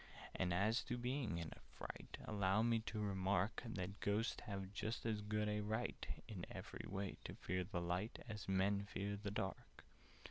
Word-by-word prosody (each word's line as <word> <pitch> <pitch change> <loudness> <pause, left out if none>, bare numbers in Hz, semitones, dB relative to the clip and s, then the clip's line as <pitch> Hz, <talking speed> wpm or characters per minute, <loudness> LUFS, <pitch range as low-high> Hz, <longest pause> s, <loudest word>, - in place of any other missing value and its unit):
"And 90 -1 +2
as 105 +7 +4
to 120 - -1
being 125 -6 0
in 85 -2 -2
a - - -14 0.2
fright, - - -5
Allow 100 0 +4
me 115 -1 +5
to 110 - -1
remark 100 0 +2
That 100 -4 -3
Ghosts 105 +3 +2
have 100 -1 -3
just 110 +3 -1
as 110 -2 +2
good 105 0 +1
a 105 0 +2
right 110 +3 -1 0.2
In 95 -6 -4
every - - -5
way, 100 0 -1
to - - -4
fear 90 +1 0
the 90 -1 -1
light, 90 +5 0
As 105 -4 -4
Men 95 +1 +4
to 100 - -4
fear 100 +1 -1
the 105 - -1
dark." 95 - -3
100 Hz, 185 wpm, -43 LUFS, 95-110 Hz, 0.2 s, me